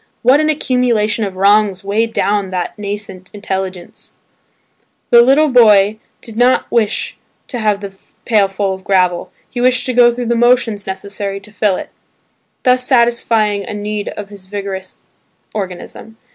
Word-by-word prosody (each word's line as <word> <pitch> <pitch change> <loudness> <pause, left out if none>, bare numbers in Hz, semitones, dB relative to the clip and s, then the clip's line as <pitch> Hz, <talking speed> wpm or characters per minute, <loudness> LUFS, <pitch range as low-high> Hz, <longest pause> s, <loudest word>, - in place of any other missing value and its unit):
What 260 +4 +5
an 310 0 +1
accumulation 245 -7 +1
of 195 -2 -6
wrongs 200 0 +2
weighed 220 +3 0
down 205 -3 0
that 180 -1 -3
nascent 200 -2 -6
intelligence! 190 -3 -5 1.0
The 235 -1 +8
little 275 +5 +4
boy 215 -4 +5 0.2
did 225 - -7
not 245 +2 +3
wish 225 -3 -1 0.3
to 245 - -4
have 210 -2 0
the 195 -1 -8 0.3
pail 210 -4 +3
full 195 0 -2
of 190 0 -9
gravel; 180 -3 +1 0.2
he 245 - -5
wished 255 0 +2
to 255 - -1
go 240 0 +6
through 245 +1 -4
the 235 +1 0
motions 235 -3 +2
necessary 200 +1 -5
to 210 +2 -15
fill 210 -2 +1
it, - - -7 0.7
thus 255 -1 +3
satisfying 235 -5 +2
a 210 - -6
need 210 0 -4
of 205 -1 -7
his 200 -2 -13
vigorous 195 -2 -6 0.6
organism. 205 +2 -7
210 Hz, 155 wpm, -16 LUFS, 195-240 Hz, 1.0 s, The